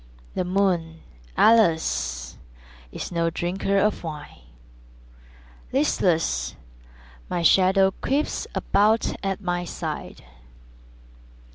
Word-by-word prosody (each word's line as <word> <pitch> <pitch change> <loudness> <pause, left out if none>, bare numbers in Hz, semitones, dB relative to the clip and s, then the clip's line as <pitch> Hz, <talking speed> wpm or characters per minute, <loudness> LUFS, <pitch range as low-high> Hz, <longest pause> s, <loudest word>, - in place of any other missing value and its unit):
The - - -1
moon, 180 -3 0 0.3
alas, 65 - +2 0.6
is - - -6
no 170 -1 +1
drinker 185 +4 -1
of 210 0 +1
wine; 155 -3 -8 1.3
Listless, 65 -3 +1 0.7
my 175 -1 -1
shadow 190 +3 +5
creeps 285 +3 -1
about 215 +3 +2
at 195 0 -2
my 175 -2 -2
side. 175 - -6
180 Hz, 85 wpm, -24 LUFS, 160-195 Hz, 1.3 s, shadow